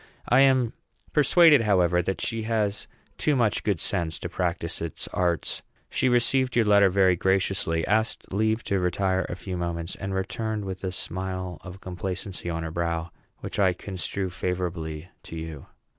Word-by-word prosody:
I 125 Hz, -, +5 dB
am 130 Hz, -3 st, +4 dB, 0.4 s
persuaded, 150 Hz, -1 st, +6 dB
however, 90 Hz, -5 st, +3 dB
that 95 Hz, +2 st, -3 dB
she 115 Hz, -1 st, -1 dB
has 110 Hz, -2 st, -1 dB, 0.3 s
too 150 Hz, -, +2 dB
much 115 Hz, -5 st, +2 dB
good 100 Hz, -6 st, 0 dB
sense 80 Hz, -2 st, -1 dB
to -, -, -5 dB
practise 85 Hz, -2 st, -2 dB
its 85 Hz, -1 st, -5 dB
arts. 85 Hz, -2 st, -1 dB, 0.3 s
She 130 Hz, -, +2 dB
received 125 Hz, +1 st, +2 dB
your 120 Hz, -2 st, +4 dB
letter 100 Hz, -1 st, +6 dB
very 95 Hz, -1 st, +4 dB
graciously, 95 Hz, -3 st, +1 dB
asked 110 Hz, -2 st, 0 dB
leave 110 Hz, +3 st, +1 dB
to 100 Hz, -, 0 dB
retire 95 Hz, +1 st, 0 dB
a -, -, -3 dB
few 95 Hz, 0 st, -5 dB
moments, 85 Hz, 0 st, -3 dB
and 95 Hz, 0 st, -4 dB
returned 110 Hz, +2 st, -2 dB
with 95 Hz, 0 st, -6 dB
a 95 Hz, -, -1 dB
smile 90 Hz, -1 st, -4 dB
of 90 Hz, +2 st, -9 dB
complacency 95 Hz, 0 st, -4 dB
on 80 Hz, -1 st, -2 dB
her 80 Hz, -, -4 dB
brow, 85 Hz, 0 st, -2 dB, 0.3 s
which -, -, -5 dB
I 95 Hz, -2 st, +4 dB
construe 95 Hz, 0 st, -4 dB
favorably 85 Hz, -3 st, -3 dB
to -, -, -9 dB
you. 80 Hz, -3 st, -7 dB
95 Hz, 165 wpm, -26 LUFS, 85-105 Hz, 0.4 s, persuaded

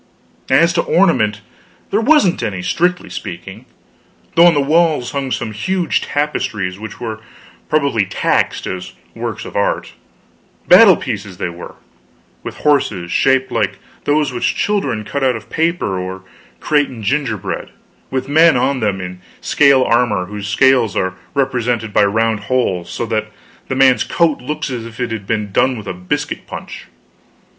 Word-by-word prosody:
As -, -, +4 dB
to -, -, +2 dB
ornament, -, -, +2 dB, 0.5 s
there -, -, +2 dB
wasn't 250 Hz, -, +3 dB
any, 100 Hz, -6 st, -3 dB
strictly 180 Hz, -, 0 dB
speaking; 85 Hz, 0 st, -8 dB, 0.7 s
though 170 Hz, +1 st, +7 dB
on 170 Hz, -, +4 dB
the -, -, +3 dB
walls 155 Hz, -2 st, +2 dB
hung 140 Hz, -1 st, -3 dB
some 115 Hz, -3 st, -3 dB
huge 175 Hz, -, -1 dB
tapestries 105 Hz, -10 st, -2 dB
which 110 Hz, -1 st, -8 dB
were 110 Hz, -2 st, -5 dB, 0.5 s
probably 140 Hz, -10 st, +1 dB
taxed 95 Hz, -, 0 dB
as 95 Hz, 0 st, -5 dB, 0.2 s
works 115 Hz, -2 st, -5 dB
of -, -, -10 dB
art; 100 Hz, -, -1 dB, 0.7 s
battle -, -, +8 dB
pieces, 95 Hz, -3 st, -5 dB
they 90 Hz, -, -2 dB
were, 85 Hz, 0 st, -10 dB, 0.7 s
with -, -, -7 dB
horses 105 Hz, -12 st, +1 dB
shaped 130 Hz, -1 st, +2 dB
like 105 Hz, -4 st, -1 dB, 0.3 s
those 145 Hz, -2 st, +1 dB
which 120 Hz, -, 0 dB
children 200 Hz, -, -1 dB
cut 140 Hz, +6 st, -3 dB
out 130 Hz, -2 st, +2 dB
of 110 Hz, -2 st, -10 dB
paper 160 Hz, -, 0 dB
or 95 Hz, +1 st, -6 dB, 0.4 s
create 145 Hz, -2 st, +1 dB
in 115 Hz, -4 st, -9 dB
gingerbread; 120 Hz, -4 st, -2 dB, 0.4 s
with 130 Hz, 0 st, -2 dB
men 160 Hz, +1 st, +5 dB
on 135 Hz, +2 st, +1 dB
them 105 Hz, -4 st, -1 dB
in 90 Hz, 0 st, -7 dB, 0.2 s
scale 140 Hz, -3 st, +4 dB
armor 115 Hz, -7 st, +1 dB
whose 105 Hz, +1 st, -6 dB
scales 125 Hz, -1 st, +3 dB
are 95 Hz, 0 st, 0 dB, 0.2 s
represented 125 Hz, -5 st, -1 dB
by -, -, +4 dB
round 110 Hz, +2 st, +1 dB
holes 100 Hz, -8 st, 0 dB
so -, -, -3 dB
that 110 Hz, -1 st, -2 dB, 0.4 s
the 130 Hz, -, -2 dB
man's 130 Hz, -1 st, +4 dB
coat 165 Hz, -6 st, +1 dB
looks 150 Hz, +2 st, -4 dB
as 120 Hz, -3 st, -4 dB
if 115 Hz, +1 st, -11 dB
it 120 Hz, -2 st, -2 dB
had 105 Hz, -3 st, -5 dB
been 105 Hz, -3 st, -2 dB
done 130 Hz, +4 st, +2 dB
with 105 Hz, -, -8 dB
a 95 Hz, -, -4 dB
biscuit 90 Hz, 0 st, -4 dB
punch. -, -, -8 dB
120 Hz, 160 wpm, -17 LUFS, 105-140 Hz, 0.7 s, battle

